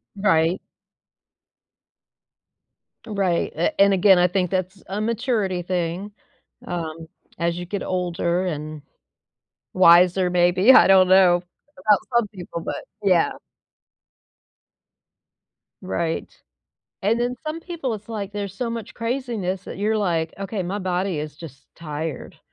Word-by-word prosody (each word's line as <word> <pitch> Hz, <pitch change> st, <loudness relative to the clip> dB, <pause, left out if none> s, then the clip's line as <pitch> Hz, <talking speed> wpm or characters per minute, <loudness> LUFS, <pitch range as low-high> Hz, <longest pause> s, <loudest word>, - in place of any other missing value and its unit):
Right. 180 Hz, -3 st, +2 dB, 2.5 s
Right, 195 Hz, -6 st, -1 dB
a 165 Hz, +3 st, -1 dB
and 200 Hz, 0 st, +6 dB
again, 190 Hz, 0 st, +5 dB
I 180 Hz, 0 st, +4 dB
think 180 Hz, -1 st, 0 dB
that's 185 Hz, +1 st, -3 dB
a 200 Hz, +2 st, -3 dB
maturity 215 Hz, -5 st, -1 dB
thing. 180 Hz, +2 st, -3 dB, 0.5 s
Um, 165 Hz, -2 st, -5 dB, 0.3 s
as 170 Hz, 0 st, -1 dB
you 175 Hz, -, -5 dB
get 195 Hz, +3 st, -4 dB
older 180 Hz, 0 st, -1 dB
and 155 Hz, -2 st, -5 dB, 0.9 s
wiser, 180 Hz, +1 st, +5 dB
maybe, 180 Hz, +5 st, +4 dB
I -, -, +8 dB
don't 190 Hz, -1 st, +6 dB
know 185 Hz, -1 st, +6 dB, 0.4 s
about 205 Hz, +2 st, +3 dB, 0.2 s
some 235 Hz, -3 st, +3 dB
people, 180 Hz, -4 st, -8 dB
but -, -, -5 dB, 0.2 s
yeah. 185 Hz, -4 st, +3 dB, 2.5 s
Right. 160 Hz, -, -3 dB, 0.7 s
And 225 Hz, +4 st, +1 dB
then 245 Hz, +1 st, -1 dB
some 310 Hz, +2 st, -3 dB
people 330 Hz, -8 st, -4 dB
it's 210 Hz, 0 st, -10 dB
like 205 Hz, -3 st, -5 dB
there's 200 Hz, -2 st, -5 dB
so 235 Hz, +2 st, -3 dB
much 230 Hz, -2 st, -6 dB
craziness 230 Hz, -6 st, -3 dB
that -, -, -8 dB
you're 215 Hz, +2 st, +1 dB
like, 165 Hz, -5 st, -1 dB
"Okay, 195 Hz, 0 st, -3 dB
my 185 Hz, +3 st, -3 dB
body 185 Hz, -2 st, -1 dB
is 150 Hz, -1 st, -6 dB
just 140 Hz, -4 st, -12 dB
tired." 155 Hz, -2 st, -6 dB
185 Hz, 125 wpm, -23 LUFS, 170-205 Hz, 2.5 s, I